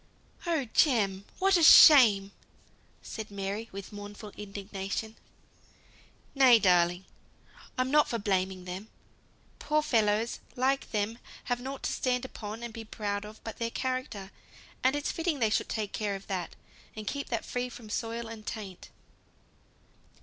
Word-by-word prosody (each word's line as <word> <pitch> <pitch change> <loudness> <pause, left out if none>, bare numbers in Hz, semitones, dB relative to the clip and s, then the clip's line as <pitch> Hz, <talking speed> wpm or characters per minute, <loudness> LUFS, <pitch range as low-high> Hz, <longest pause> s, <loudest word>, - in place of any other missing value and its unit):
"Oh 320 -6 +1
Jem! 200 -9 +2
what 385 0 +4
a - - +1
shame!" 230 -11 +8 0.7
said 220 -1 -7
Mary, 200 +3 -4
with 200 +2 -8
mournful 205 +1 -9
indignation. 200 +1 -5 1.2
"Nay, 260 -4 +7
darling! 180 -2 +3 0.7
I'm 255 +1 0
not 300 0 +4
for 235 - -1
blaming 190 -3 -1
them. 185 +4 -6 0.7
Poor 305 0 +1
fellows 225 -3 +1 0.2
like 270 +2 0
them 220 +1 -2 0.2
have 245 0 -2
nought 265 +1 -6
to - - -1
stand 250 0 0
upon 220 -2 -7
and 235 -1 -6
be 225 - -7
proud 205 -1 -4
of 215 +1 -12
but 225 - -7
their 230 0 -1
character, 255 -6 -4 0.5
and 260 +2 +3
it's 290 - -1
fitting 330 -2 -1
they 225 -4 +1
should - - 0
take 215 -2 -3
care 205 -2 -2
of 195 - -9
that, 185 -4 -4 0.4
and 215 -1 -7
keep 280 +5 -4
that 230 - -2
free 250 0 -3
from 230 -3 -11
soil 230 0 -3
and 225 -1 -10
taint." 200 -5 -7
220 Hz, 150 wpm, -29 LUFS, 200-255 Hz, 1.2 s, shame